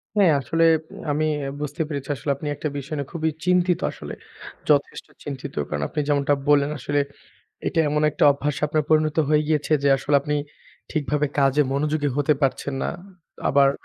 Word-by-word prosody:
হ্যাঁ, 195 -6 +5
আসলে 165 +6 +1 0.5
আমি 155 +2 +1 0.2
অ্যা 135 - -3
বুঝতে 150 +2 -3
পেরেছি 140 -3 -5
আসলে 140 +3 -2
আপনি 145 +2 -7
একটা 155 - -3
বিষয় 140 +3 -5
নিয়ে 140 -1 -4
খুবই 160 -1 0 0.2
চিন্তিত 180 -1 +3
আসলে, - - -8 0.6
যথেষ্ট - - +2 0.2
চিন্তিত। 140 -1 -6 0.2
কারণ 75 -1 -2
আপনি - - -4
যেমনটা 145 -1 +2 0.2
বললেন 145 0 +4
আসলে 145 +3 0 0.7
এইটা 165 - 0
এমন 150 +1 +1
একটা - - 0
অভ্যাস 140 0 -2
আপনার 155 +1 +1
পরিণত 155 0 +2
হয়ে 150 0 +4
গিয়েছে 155 0 +1
যে, 140 - +4
আসলে 145 +2 +1
আপনি 150 +1 -1 0.6
ঠিকভাবে 150 -1 0
কাজে 140 +1 +4
মনোযোগী 150 +1 0
হতে 145 +1 +3
পারছেন 135 +1 0
না। - - -1 0.6
আবার 140 0 +5
145 Hz, 170 wpm, -23 LUFS, 140-155 Hz, 0.7 s, হ্যাঁ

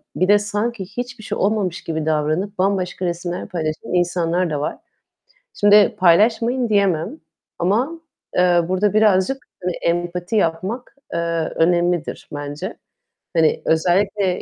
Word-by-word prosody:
bir 185 - +1
de 205 +1 +6
sanki 210 +1 -2
hiçbir 245 +3 -7
şey - - -4
olmamış 200 -3 0
gibi 160 -2 -3
davranıp 155 +6 -1
bambaşka 185 -1 0
resimler 175 0 -3
paylaşan 155 -2 -4
insanlar 175 0 +1
da 150 -2 -2
var. 150 - -3 0.8
Şimdi 205 +2 +5
"Paylaşmayın." 225 +7 +3
diyemem 200 - +1 0.4
ama, 245 - 0 0.3
eee, 180 -1 +4
burada 195 +2 +1
birazcık 215 +3 +3 0.3
hani 180 -1 -1
empati 175 +3 -2
yapmak, 200 +8 -1 0.2
eee, 170 - 0 0.4
önemlidir 175 0 +1
bence. 145 0 -5 0.6
Hani 160 -2 +2
özellikle 185 +3 +1
185 Hz, 120 wpm, -20 LUFS, 170-210 Hz, 0.8 s, de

